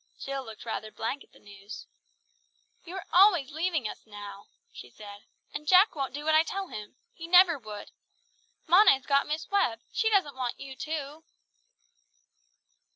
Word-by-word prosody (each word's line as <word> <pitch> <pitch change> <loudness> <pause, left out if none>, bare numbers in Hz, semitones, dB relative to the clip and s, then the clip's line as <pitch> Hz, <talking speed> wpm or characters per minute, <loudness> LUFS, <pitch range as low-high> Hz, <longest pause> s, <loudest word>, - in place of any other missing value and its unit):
Jill 275 0 -4
looked 225 -2 -11
rather 220 -1 -4
blank 270 +7 -4
at - - -27
the - - -20
news. 200 +1 -11 1.0
"You 355 +2 -8
are 385 - -6
always 355 -7 +5
leaving 320 -5 -1
us - - -10
now," 205 -1 -10 0.3
she 125 - -11
said; 205 - -12 0.3
"and 300 +1 -6
Jack 370 +5 +6
won't 270 -3 -3
do 295 +1 -6
what 315 - +2
I 310 - +6
tell 380 +3 -4
him. 210 +2 -9 0.2
He 335 -7 -9
never 355 -3 +6
would. 210 -3 -9 0.7
Mona 370 +6 +7
has 265 -1 -4
got 280 -1 +2
Miss 310 +5 -4
Webb, 235 - +1
she 445 - +1
doesn't 380 -10 +1
want 250 -2 -4
you 270 -1 -9
too!" 305 +1 -5
280 Hz, 165 wpm, -28 LUFS, 225-340 Hz, 1.0 s, Mona